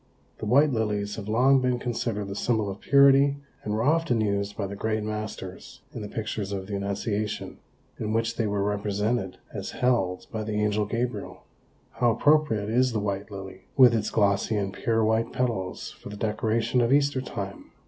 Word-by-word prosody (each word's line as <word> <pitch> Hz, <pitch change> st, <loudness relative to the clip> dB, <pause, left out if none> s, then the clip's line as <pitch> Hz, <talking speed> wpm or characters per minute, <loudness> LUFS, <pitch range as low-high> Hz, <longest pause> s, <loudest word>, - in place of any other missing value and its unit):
The 110 Hz, -, -4 dB
white 140 Hz, +5 st, +4 dB
lilies 105 Hz, -2 st, -1 dB
have 105 Hz, -2 st, -6 dB
long 130 Hz, +4 st, +4 dB
been 125 Hz, -1 st, +1 dB
considered 115 Hz, -4 st, -2 dB
the 100 Hz, -, -5 dB
symbol 110 Hz, -2 st, 0 dB
of 95 Hz, -, -8 dB
purity 140 Hz, 0 st, +5 dB, 0.3 s
and 105 Hz, -, -3 dB
were 110 Hz, +2 st, 0 dB
often 155 Hz, -4 st, +2 dB
used 100 Hz, -1 st, -1 dB
by -, -, -1 dB
the 100 Hz, +1 st, -5 dB
great 110 Hz, +1 st, -1 dB
masters 105 Hz, -3 st, -6 dB
in -, -, -6 dB
the 105 Hz, -, -5 dB
pictures 105 Hz, -2 st, -4 dB
of 95 Hz, -1 st, -3 dB
the 100 Hz, +1 st, -4 dB
Annunciation, 100 Hz, +1 st, -3 dB, 0.4 s
in 110 Hz, -1 st, -2 dB
which 115 Hz, +1 st, 0 dB
they 115 Hz, -2 st, 0 dB
were 100 Hz, -1 st, 0 dB
represented 105 Hz, 0 st, -1 dB, 0.2 s
as -, -, -5 dB
held 95 Hz, -8 st, +1 dB
by 110 Hz, -1 st, -3 dB
the 105 Hz, 0 st, -3 dB
Angel 105 Hz, 0 st, +1 dB
Gabriel. 115 Hz, -2 st, -3 dB, 0.5 s
How 120 Hz, +1 st, +2 dB
appropriate 115 Hz, -3 st, +3 dB
is 125 Hz, +1 st, +3 dB
the 110 Hz, -, 0 dB
white 100 Hz, 0 st, -3 dB
lily, 95 Hz, -2 st, -9 dB
with 125 Hz, -3 st, +8 dB
its 110 Hz, -2 st, 0 dB
glossy 100 Hz, +1 st, +2 dB
and 100 Hz, -1 st, -2 dB
pure 115 Hz, +2 st, +1 dB
white 110 Hz, +1 st, +1 dB
petals 115 Hz, -8 st, -2 dB
for -, -, -11 dB
the 105 Hz, -, -8 dB
decoration 110 Hz, +3 st, 0 dB
of 120 Hz, +1 st, +2 dB
Easter 140 Hz, -1 st, +3 dB
time! 100 Hz, -6 st, -6 dB
110 Hz, 185 wpm, -26 LUFS, 100-120 Hz, 0.5 s, with